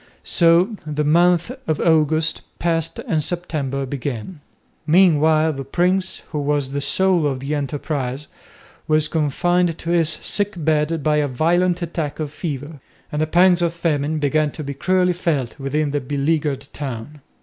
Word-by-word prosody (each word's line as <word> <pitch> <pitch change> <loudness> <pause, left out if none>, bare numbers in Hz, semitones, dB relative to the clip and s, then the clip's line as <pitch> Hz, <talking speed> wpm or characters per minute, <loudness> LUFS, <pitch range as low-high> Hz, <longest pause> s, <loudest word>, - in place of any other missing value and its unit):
So 175 +5 +3
the 150 0 -2
month 175 +3 +3 0.2
of 155 -2 0
August 155 -1 +2 0.2
passed 165 -1 -1
and 155 -2 -1
September 145 -6 -2
began. 140 - -5 0.5
Meanwhile 160 -2 +4
the 135 -1 -5
prince, 180 +6 0
who 150 - -2
was 145 -2 -1
the 140 0 -2
soul 175 +2 +2
of 135 -2 -2
the 140 +3 -3
enterprise, 140 -1 -3 0.6
was 155 0 +3
confined 165 +3 +1
to 170 - -4
his 165 -3 +3
sick 205 +5 0
bed 155 -1 0
by 150 -1 +2
a 150 -1 +1
violent 175 +6 +1
attack 165 -3 -4
of 150 -2 -3
fever, 145 -2 -5 0.3
and 150 - -1
the 155 - +1
pangs 180 +2 +4
of 170 -1 0
famine 155 -2 0
began 150 +1 +1
to 155 - -6
be 140 0 -4
cruelly 180 +5 +1
felt 150 -8 -2
within 145 +2 -1
the 145 0 -1
beleaguered 145 +1 -1
town. 140 +1 -6
155 Hz, 155 wpm, -21 LUFS, 145-170 Hz, 0.6 s, Meanwhile